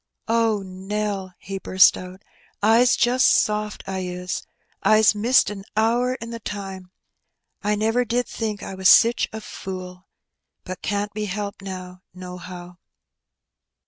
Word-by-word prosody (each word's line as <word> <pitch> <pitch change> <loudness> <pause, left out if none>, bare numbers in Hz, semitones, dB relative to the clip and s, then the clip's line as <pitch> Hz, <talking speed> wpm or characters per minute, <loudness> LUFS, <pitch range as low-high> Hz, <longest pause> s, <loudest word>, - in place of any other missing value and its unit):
'^ - - -57 0.2
Oh, 225 -3 +2
Nell! 190 0 -4
'' - - -50
he 195 0 -3
burst 185 -1 +5
out, 185 +1 -9
^' - - -34 0.4
I's 230 +3 +5
just 250 +2 +3
soft, 210 0 +1
I 190 -1 -3
is. 180 0 -4 0.3
I's 215 0 +5
missed 225 +3 +3
a 195 -2 -7
hour 240 +3 +2
in 230 -2 -8
the 230 - -6
time. 195 -3 -7 0.7
I 210 +1 +1
never 225 +4 +1
did 245 +1 -1
think 215 -3 -4
I - - -6
was 190 0 +3
sich 230 +1 +6
a 220 - -6
fool. 185 -2 -8 0.6
But 185 0 -7
can't 205 0 -2
be 210 0 -3
helped 200 0 -4
now, 185 -1 -8
nohow." 180 -1 -9
205 Hz, 150 wpm, -23 LUFS, 185-220 Hz, 0.7 s, sich